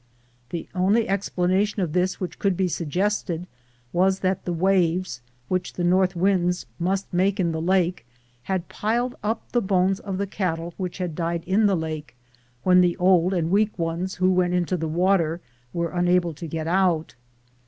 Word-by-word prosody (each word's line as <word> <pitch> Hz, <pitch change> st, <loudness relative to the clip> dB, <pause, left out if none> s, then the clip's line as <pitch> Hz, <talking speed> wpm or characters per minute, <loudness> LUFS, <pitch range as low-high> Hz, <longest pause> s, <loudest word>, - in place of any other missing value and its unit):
The 170 Hz, -, -5 dB
only 200 Hz, +5 st, +2 dB
explanation 195 Hz, +1 st, 0 dB
of 160 Hz, -4 st, -3 dB
this 185 Hz, +1 st, 0 dB
which 185 Hz, -, -5 dB
could 195 Hz, -3 st, +1 dB
be 190 Hz, -, +2 dB
suggested 180 Hz, +1 st, -1 dB, 0.5 s
was 190 Hz, +2 st, +2 dB
that 185 Hz, 0 st, -1 dB
the 180 Hz, -, -1 dB
waves 180 Hz, -4 st, +1 dB, 0.3 s
which 185 Hz, +3 st, -2 dB
the 175 Hz, -, -3 dB
north 185 Hz, +1 st, +3 dB
winds 180 Hz, -1 st, +1 dB
must 190 Hz, +3 st, -1 dB
make 190 Hz, +3 st, +2 dB
in 170 Hz, -3 st, +1 dB
the 160 Hz, 0 st, -3 dB
lake 180 Hz, -5 st, +1 dB, 0.4 s
had 185 Hz, -2 st, -2 dB
piled 240 Hz, +4 st, -1 dB
up 220 Hz, +2 st, -3 dB
the 240 Hz, -, +2 dB
bones 190 Hz, -1 st, +2 dB
of 195 Hz, -2 st, -4 dB
the 200 Hz, -, -1 dB
cattle 170 Hz, -4 st, -3 dB
which 180 Hz, -2 st, -4 dB
had 180 Hz, -3 st, -3 dB
died 170 Hz, +1 st, -2 dB
in 200 Hz, +4 st, +3 dB
the 195 Hz, -2 st, +2 dB
lake, 155 Hz, -4 st, -5 dB, 0.5 s
when 180 Hz, 0 st, +6 dB
the 175 Hz, -1 st, +2 dB
old 180 Hz, -1 st, +4 dB
and 170 Hz, -3 st, 0 dB
weak 210 Hz, +2 st, +2 dB
ones 170 Hz, +2 st, -2 dB
who 185 Hz, +1 st, +2 dB
went 180 Hz, -1 st, +2 dB
into 180 Hz, +1 st, 0 dB
the 160 Hz, -2 st, -2 dB
water 170 Hz, 0 st, +1 dB, 0.3 s
were 170 Hz, -1 st, -2 dB
unable 175 Hz, -1 st, +2 dB
to 165 Hz, +3 st, -7 dB
get 160 Hz, 0 st, -4 dB
out. 175 Hz, -2 st, +1 dB
180 Hz, 175 wpm, -24 LUFS, 170-190 Hz, 0.5 s, when